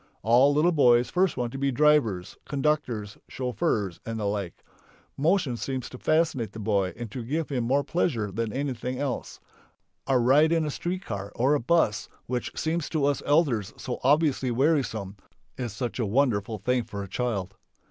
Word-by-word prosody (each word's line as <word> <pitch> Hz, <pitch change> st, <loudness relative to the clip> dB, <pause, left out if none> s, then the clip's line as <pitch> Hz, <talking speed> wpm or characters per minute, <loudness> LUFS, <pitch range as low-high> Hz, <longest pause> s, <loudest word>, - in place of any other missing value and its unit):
All 120 Hz, +6 st, +5 dB
little 155 Hz, +5 st, +3 dB
boys 125 Hz, -6 st, +4 dB
first 185 Hz, 0 st, +1 dB
want 120 Hz, -1 st, -2 dB
to 135 Hz, -, -6 dB
be 140 Hz, 0 st, +1 dB
drivers, 125 Hz, -10 st, +2 dB
conductors, 135 Hz, -8 st, -1 dB
chauffeurs, 110 Hz, -7 st, -2 dB
and 115 Hz, 0 st, -4 dB
the -, -, -3 dB
like. 100 Hz, -4 st, -3 dB, 0.5 s
Motion 155 Hz, -3 st, +1 dB
seems 130 Hz, 0 st, -4 dB
to 125 Hz, -, -10 dB
fascinate 155 Hz, -7 st, +1 dB
the 110 Hz, -, -8 dB
boy 100 Hz, -3 st, 0 dB
and 120 Hz, -3 st, -6 dB
to 125 Hz, 0 st, -5 dB
give 155 Hz, +7 st, -2 dB
him 125 Hz, -5 st, -1 dB
more 140 Hz, +4 st, +2 dB
pleasure 120 Hz, -, -1 dB
than 110 Hz, +2 st, -2 dB
anything 130 Hz, -1 st, -3 dB
else. 140 Hz, -3 st, -4 dB, 0.7 s
A 135 Hz, -2 st, +3 dB
ride 140 Hz, +6 st, +4 dB
in 165 Hz, -2 st, +2 dB
a 150 Hz, -, -2 dB
street 180 Hz, +6 st, -4 dB
car 100 Hz, -1 st, -5 dB
or 130 Hz, +5 st, +3 dB
a 150 Hz, -, +2 dB
bus 125 Hz, -5 st, +1 dB, 0.2 s
which 125 Hz, 0 st, -3 dB
seems 160 Hz, 0 st, -1 dB
to 155 Hz, -4 st, 0 dB
us 145 Hz, -1 st, +1 dB
elders 140 Hz, -, +2 dB
so 125 Hz, -, -5 dB
obviously 140 Hz, -1 st, +3 dB
wearisome 120 Hz, -7 st, 0 dB, 0.4 s
is 125 Hz, -3 st, -4 dB
such 120 Hz, +4 st, -4 dB
a 115 Hz, -, +1 dB
wonderful 110 Hz, -2 st, +1 dB
thing 125 Hz, +2 st, 0 dB
for 100 Hz, -2 st, -6 dB
a -, -, -7 dB
child. 100 Hz, -3 st, -2 dB
125 Hz, 180 wpm, -26 LUFS, 110-145 Hz, 0.7 s, All